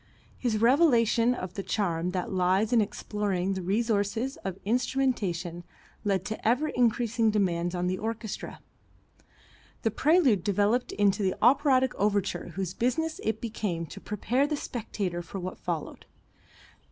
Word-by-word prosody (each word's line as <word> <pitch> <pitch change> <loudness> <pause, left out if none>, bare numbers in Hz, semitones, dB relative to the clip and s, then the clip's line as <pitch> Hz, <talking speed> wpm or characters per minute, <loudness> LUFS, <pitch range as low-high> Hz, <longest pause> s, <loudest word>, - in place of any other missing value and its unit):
His 235 -4 0
revelation 240 -2 +4
of 185 -6 -6
the 195 - -4
charm 180 -5 -1
that 180 -1 -3
lies 190 +5 +2
in 235 - +5
exploring 200 -2 -2
the 190 - -3
resources 220 +5 0
of 190 -1 -5
instrumentation 205 -8 -1 0.4
led 195 -3 0
to 215 0 -4
ever 265 +7 +2
increasing 235 -2 +2
demands 175 -4 0
on 175 0 -1
the 185 +1 -1
orchestra. 220 -1 -5 1.2
The 225 - +2
prelude 275 - +3
developed 205 +4 +1
into 205 0 +2
the 190 -2 +1
operatic 260 +1 +4
overture 200 -3 0
whose 190 -2 -3
business 315 +7 -1
it 220 0 -1
became 205 -7 -3
to 195 +4 -10
prepare 245 +7 0
the 300 0 -1
spectator 200 -9 -4
for 175 +3 -7
what 185 0 -6
followed. 170 -4 -5
210 Hz, 140 wpm, -28 LUFS, 185-240 Hz, 1.2 s, in